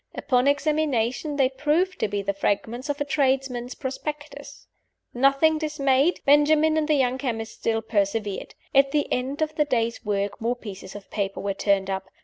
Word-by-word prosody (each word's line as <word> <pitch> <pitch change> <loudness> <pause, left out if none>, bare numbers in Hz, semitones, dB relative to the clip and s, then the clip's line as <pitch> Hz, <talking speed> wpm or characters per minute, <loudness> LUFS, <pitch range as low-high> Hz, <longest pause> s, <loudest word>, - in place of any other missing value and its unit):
Upon 250 0 +1
examination, 285 -2 0
they 270 -2 +3
proved 305 +7 0
to - - +1
be 205 -1 -3
the 200 0 -1
fragments 230 +7 -2
of 290 - -2
a 290 - -1
tradesman's 265 -3 0
prospectus. 295 +2 -7 0.5
Nothing 275 +5 +3
dismayed, 295 0 +1
Benjamin 300 +2 +4
and 310 -1 +1
the 305 - +3
young 260 -2 +1
chemist 225 -5 -3
still 225 0 0
persevered. 205 -2 -2 0.2
At 275 0 +5
the 295 +1 0
end 270 +5 -1
of 310 0 -3
the 300 -1 +1
day's 235 -4 -1
work 205 -1 -2
more 235 +2 0
pieces 200 -5 -9
of 205 -1 -11
paper 200 -2 -2
were 200 0 -2
turned 195 -1 +1
up. 190 0 -3
260 Hz, 170 wpm, -25 LUFS, 220-295 Hz, 0.5 s, At